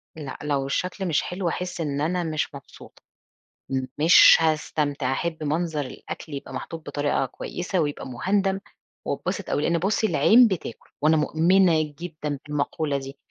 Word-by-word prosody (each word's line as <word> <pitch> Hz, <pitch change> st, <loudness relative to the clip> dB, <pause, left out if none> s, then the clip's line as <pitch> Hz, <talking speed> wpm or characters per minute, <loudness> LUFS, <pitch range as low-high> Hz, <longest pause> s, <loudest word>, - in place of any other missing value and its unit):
لأ 145 Hz, -4 st, -7 dB
لو 140 Hz, -2 st, 0 dB
الشكل 185 Hz, +7 st, -2 dB
مش 160 Hz, -, +2 dB
حلو، 180 Hz, 0 st, -3 dB
هاحس 180 Hz, +1 st, -3 dB
إن 145 Hz, -2 st, -2 dB
أنا 175 Hz, +3 st, 0 dB
مش 155 Hz, -3 st, -2 dB
مبسوطة، 140 Hz, -, -13 dB, 1.0 s
مش 165 Hz, +3 st, +8 dB
هاستمتع. 150 Hz, -4 st, 0 dB
أحب 160 Hz, +2 st, -2 dB
منظر 155 Hz, 0 st, -1 dB
الأكل 145 Hz, +3 st, -8 dB
يبقى 140 Hz, -1 st, -7 dB
محطوط 160 Hz, +5 st, -6 dB
بطريقة 145 Hz, -2 st, 0 dB
كويسة 180 Hz, +7 st, -4 dB
ويبقى 145 Hz, -4 st, -2 dB
مهندَم 190 Hz, +9 st, 0 dB, 0.5 s
واتبسط -, -, -3 dB
أوي؛ -, -, -1 dB
لأن 170 Hz, +2 st, +1 dB
بصي 210 Hz, +5 st, +1 dB
العين 240 Hz, +4 st, +6 dB
بتاكل، 185 Hz, -, -5 dB
وأنا 155 Hz, +1 st, +4 dB
مؤمنة 165 Hz, +2 st, +3 dB, 0.2 s
جدًا 150 Hz, -5 st, -5 dB
بالمقولة 150 Hz, 0 st, -1 dB
دي. 135 Hz, 0 st, -8 dB
155 Hz, 145 wpm, -24 LUFS, 145-180 Hz, 1.0 s, مش